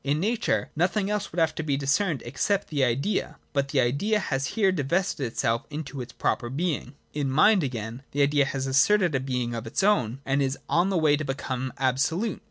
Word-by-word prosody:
In 145 +2 0
Nature 225 +6 0
nothing 190 +5 +1
else 210 -1 -2
would 165 - -10
have 165 -2 +2
to - - -4
be 145 -3 0
discerned, 145 - 0
except 200 +11 -1
the 145 -3 0
Idea: 135 - 0 0.2
but 140 -2 +1
the 140 0 0
Idea 140 - +1
has 135 -9 -1
here 195 -3 +4
divested 165 -3 0
itself 115 0 -1
of 145 -3 -5
its 125 - -8
proper 120 - -1
being. 145 -2 -2 0.2
In 145 -2 -1
Mind, 195 +9 +5
again, 115 -2 -4
the 145 0 +1
Idea 145 0 +3
has 135 0 -3
asserted 170 +7 +3
a 135 - +1
being 125 -2 -2
of 115 0 -5
its 115 - -1
own, 135 - +2
and 135 +1 +1
is 135 0 0
on 175 +3 +2
the 190 - +1
way 150 -3 +4
to 155 - -3
become 130 -2 -3
absolute. 135 - 0
140 Hz, 205 wpm, -26 LUFS, 130-180 Hz, 0.2 s, Mind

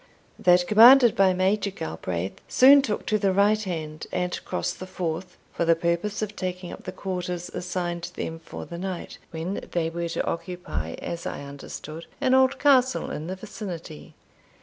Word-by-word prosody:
That 180 0 +5
commanded 240 +3 +8
by 195 -1 +5
Major 195 +3 +1
Galbraith 85 - -5
soon 275 +2 +7
took 215 -6 -3
to 215 - +1
the 195 -1 +2
right 205 +3 +3
hand, 155 -6 -5
and 180 0 -2
crossed - - -3
the 185 - -7
Forth, 180 0 -4 0.2
for - - -1
the 165 0 +4
purpose 170 +6 -1
of 210 0 -5
taking 180 -1 -4
up - - -10
the - - -4
quarters 180 -2 -4
assigned 175 -1 -3
them 165 0 -4
for - - -8
the 170 - -8
night, 185 -1 -5
when 165 +5 -4
they 165 -2 0
were 170 0 -3
to 165 - -2
occupy, 165 - -4
as 170 0 -5
I - - -5
understood, 145 +3 -8
an 255 - +2
old 265 +1 +4
castle 260 -3 +3
in 150 +2 -5
the 185 - -3
vicinity. 190 - -8
180 Hz, 170 wpm, -25 LUFS, 165-205 Hz, 0.2 s, commanded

